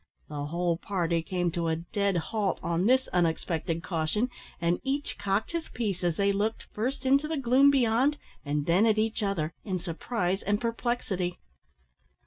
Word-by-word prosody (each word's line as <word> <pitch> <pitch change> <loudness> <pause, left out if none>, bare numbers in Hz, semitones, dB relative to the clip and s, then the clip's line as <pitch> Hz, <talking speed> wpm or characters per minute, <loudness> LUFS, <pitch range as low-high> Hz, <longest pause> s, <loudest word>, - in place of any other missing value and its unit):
The 145 -1 -4
whole 170 +2 0
party 170 -3 0
came 175 0 -1
to 170 -1 -1
a 160 - +2
dead 195 +3 -1
halt 200 +3 -1
on 170 +3 +1
this 260 +1 +4
unexpected 165 -1 0
caution, 185 +9 0 0.3
and 170 +1 +1
each 275 +2 -2
cocked 200 +2 0
his 335 -1 -3
piece 200 -6 -2
as 175 -2 +1
they 200 0 +3
looked, 210 +3 -1
first 255 +6 -2
into 275 +3 +4
the 320 0 -2
gloom 270 +2 +5
beyond, 265 +2 +3 0.3
and 145 0 -1
then 180 +7 +4
at 215 -1 +3
each 220 +1 0
other, 170 -6 -1
in 190 -3 -2
surprise 180 +2 -2
and 205 +1 0
perplexity. 230 -6 -1
195 Hz, 165 wpm, -28 LUFS, 170-230 Hz, 0.3 s, gloom